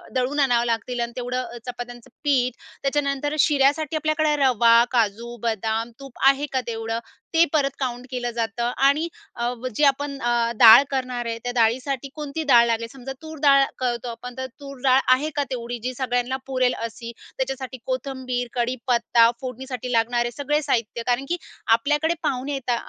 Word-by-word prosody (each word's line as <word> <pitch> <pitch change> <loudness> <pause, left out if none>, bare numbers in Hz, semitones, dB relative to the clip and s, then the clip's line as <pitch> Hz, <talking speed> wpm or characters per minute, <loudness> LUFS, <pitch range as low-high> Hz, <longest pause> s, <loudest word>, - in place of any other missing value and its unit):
दळून 260 +3 0
आणावं 245 -4 +3
लागतील 235 +1 -2
आणि 235 0 -2
तेवढं 250 0 -2
अ, 240 0 -9
चपात्यांचं 245 0 -8
पीठ. 255 -4 +2 0.3
त्याच्यानंतर 280 +1 0
शिऱ्यासाठी 290 +1 +3
आपल्याकडे 310 -1 +1
रवा, 235 -2 +5 0.2
काजू, 235 0 0
बदाम, 225 +1 -1
तूप 275 -2 -12
आहे 275 +1 +4
का 260 - +1
तेवढं? 225 0 -3 0.3
ते 330 +1 +6
परत 280 -3 +2
काउंट 250 -1 -3
केलं 245 -1 -2
जातं. 235 +1 -1
आणि 300 +4 +3 0.3
अ, 235 0 -1
व, 255 +2 -5
जे 300 - +1
आपण 280 0 +1
अ - - +2 0.3
डाळ 230 +2 +10
करणार 255 -2 -2
आहे, 230 0 -3
त्या 245 - -2
डाळीसाठी 250 +4 +1
कोणती 300 +1 -4
डाळ 240 -4 +6
लागेल, 230 0 -1
समजा 270 0 -8
तूर 315 0 -9
डाळ 275 -2 +6 0.2
करतो 245 -1 -2
आपण, 245 +2 -8
तर 260 - -3
तूर 275 -1 -9
डाळ 265 0 +5
आहे 290 +4 0
का 290 - +1
तेवढी, 240 -1 -4
जी 255 +1 -2
सगळ्यांना 250 0 -1
पुरेल 255 -2 +1
अशी. 230 +1 -6 0.3
त्याच्यासाठी 265 -1 -4
कोथिंबीर, 255 -2 -3
कढीपत्ता, 240 -1 +2
फोडणीसाठी 255 -1 -5
लागणारे 240 +1 +1
सगळे 295 +3 -1
साहित्य, 235 -4 -1
कारण 250 +2 +1
की 350 - 0 0.4
आपल्याकडे 295 +6 +1
पाहुणे 275 -1 -1
येता 255 -3 -1
255 Hz, 170 wpm, -23 LUFS, 240-275 Hz, 0.4 s, डाळ